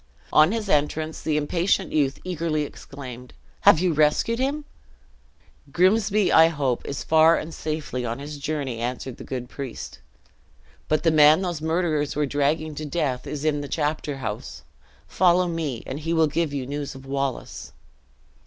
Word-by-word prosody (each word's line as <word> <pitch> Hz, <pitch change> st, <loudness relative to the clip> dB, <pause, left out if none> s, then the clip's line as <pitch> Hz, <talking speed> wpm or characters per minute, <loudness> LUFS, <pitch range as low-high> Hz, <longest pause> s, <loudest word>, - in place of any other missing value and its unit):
On 155 Hz, +4 st, +6 dB
his 220 Hz, -2 st, -2 dB
entrance, 155 Hz, 0 st, 0 dB
the 155 Hz, -1 st, 0 dB
impatient 170 Hz, +5 st, 0 dB
youth 145 Hz, -2 st, +1 dB
eagerly 165 Hz, -4 st, -1 dB
exclaimed, 125 Hz, -3 st, -9 dB, 0.2 s
"Have -, -, +6 dB
you 180 Hz, -1 st, +1 dB
rescued 155 Hz, +10 st, +2 dB
him?" 285 Hz, +3 st, -1 dB, 1.1 s
"Grimsby, 200 Hz, +4 st, +3 dB
I 160 Hz, 0 st, +8 dB
hope, 140 Hz, -7 st, -1 dB
is 140 Hz, -, -4 dB
far 160 Hz, +1 st, +5 dB
and 160 Hz, +1 st, -5 dB
safely 155 Hz, -6 st, -4 dB
on 115 Hz, -1 st, -3 dB
his 145 Hz, +1 st, -7 dB
journey," 140 Hz, -5 st, -3 dB
answered 125 Hz, +1 st, -4 dB
the -, -, -9 dB
good 125 Hz, -2 st, -5 dB
priest; 135 Hz, -2 st, -7 dB, 0.9 s
"but 155 Hz, -, +1 dB
the 165 Hz, -, +4 dB
man 155 Hz, +3 st, +6 dB
those 175 Hz, -4 st, -3 dB
murderers 160 Hz, -2 st, 0 dB
were 150 Hz, 0 st, +1 dB
dragging 145 Hz, +3 st, 0 dB
to 155 Hz, -, -6 dB
death, 140 Hz, -5 st, -2 dB
is 150 Hz, 0 st, -4 dB
in 145 Hz, -2 st, +1 dB
the 145 Hz, -, -6 dB
chapter 150 Hz, -1 st, -2 dB
house. 110 Hz, -5 st, -6 dB, 0.4 s
Follow 180 Hz, 0 st, +3 dB
me, 160 Hz, -8 st, -3 dB
and 140 Hz, -, -5 dB
he 165 Hz, +2 st, -2 dB
will 160 Hz, -1 st, +4 dB
give 155 Hz, +1 st, -1 dB
you 140 Hz, -3 st, -3 dB
news 145 Hz, +1 st, -5 dB
of 135 Hz, 0 st, -11 dB
Wallace." 135 Hz, -1 st, -4 dB
150 Hz, 160 wpm, -24 LUFS, 140-165 Hz, 1.1 s, I